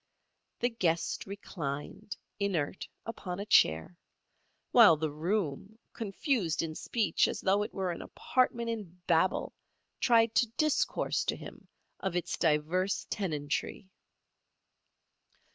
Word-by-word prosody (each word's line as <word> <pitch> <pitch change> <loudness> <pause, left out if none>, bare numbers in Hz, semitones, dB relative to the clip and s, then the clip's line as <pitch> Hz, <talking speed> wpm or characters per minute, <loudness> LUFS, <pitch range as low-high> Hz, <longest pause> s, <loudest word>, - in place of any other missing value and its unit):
The 245 - +3
guest 175 -9 -1
reclined, 170 -3 -6 0.2
inert, 185 -5 -1 0.2
upon 190 -5 -5
a 200 - -3
chair, 125 - +3 0.7
while 215 -10 +8
the 155 0 -2
room, 180 +4 -2 0.2
confused 205 - -1
in 160 -1 -4
speech 220 +6 +1
as - - -3
though 195 +2 +2
it 210 - -3
were 190 -2 -2
an 170 - -6
apartment 235 -2 0
in 190 -6 -7
Babel, 170 +2 +2 0.5
tried 230 -2 +4
to 240 - +3
discourse 305 -2 +1
to - - 0
him - - -11 0.3
of 190 -2 -2
its 175 - -1
divers 165 +5 +1
tenantry. 175 +1 -3
190 Hz, 115 wpm, -31 LUFS, 165-220 Hz, 0.7 s, while